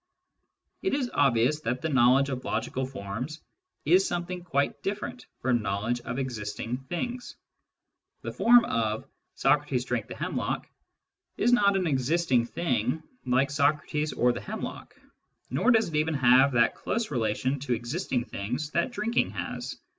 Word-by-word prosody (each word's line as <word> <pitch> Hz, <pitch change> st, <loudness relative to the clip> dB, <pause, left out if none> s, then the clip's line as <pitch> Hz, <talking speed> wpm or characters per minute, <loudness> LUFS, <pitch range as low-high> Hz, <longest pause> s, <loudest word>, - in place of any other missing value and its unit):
It 380 Hz, -, 0 dB
is 255 Hz, -4 st, -2 dB
obvious 135 Hz, +1 st, +3 dB
that 125 Hz, +1 st, -2 dB
the 160 Hz, -, 0 dB
knowledge 135 Hz, 0 st, +4 dB
of 130 Hz, -2 st, -4 dB
logical 130 Hz, 0 st, -2 dB
forms 130 Hz, +5 st, -6 dB, 0.5 s
is 180 Hz, +5 st, +5 dB
something 175 Hz, 0 st, -3 dB
quite 140 Hz, -5 st, -1 dB
different 195 Hz, -11 st, -4 dB
from 120 Hz, -2 st, +2 dB
knowledge 110 Hz, +4 st, -1 dB
of 125 Hz, +1 st, -5 dB
existing 115 Hz, -2 st, -3 dB
things. 240 Hz, -, -5 dB, 0.9 s
The -, -, -4 dB
form 240 Hz, 0 st, +6 dB
of 110 Hz, -, -1 dB, 0.2 s
" -, -, -52 dB
Socrates 135 Hz, -3 st, +2 dB
drank 120 Hz, -4 st, -2 dB
the -, -, -7 dB
hemlock -, -, -3 dB, 0.4 s
" -, -, -53 dB
is 240 Hz, +2 st, +3 dB
not 200 Hz, -4 st, +4 dB
an 185 Hz, -, 0 dB
existing 135 Hz, -3 st, +1 dB
thing 125 Hz, 0 st, -1 dB, 0.2 s
like 130 Hz, +3 st, +2 dB
Socrates 150 Hz, +1 st, +1 dB
or 125 Hz, -, +2 dB
the 120 Hz, -, -6 dB
hemlock, -, -, -6 dB, 0.6 s
nor 135 Hz, -, +2 dB
does 225 Hz, -5 st, +4 dB
it 155 Hz, -, -5 dB
even 155 Hz, +1 st, +1 dB
have 130 Hz, +1 st, +5 dB
that 115 Hz, -2 st, +4 dB
close 230 Hz, -5 st, -3 dB
relation 125 Hz, +2 st, 0 dB
to 130 Hz, -2 st, -1 dB
existing 120 Hz, -, -2 dB
things 125 Hz, +10 st, -4 dB
that 170 Hz, +9 st, +1 dB
drinking 230 Hz, 0 st, 0 dB
has. -, -, -5 dB
135 Hz, 155 wpm, -28 LUFS, 120-170 Hz, 0.9 s, form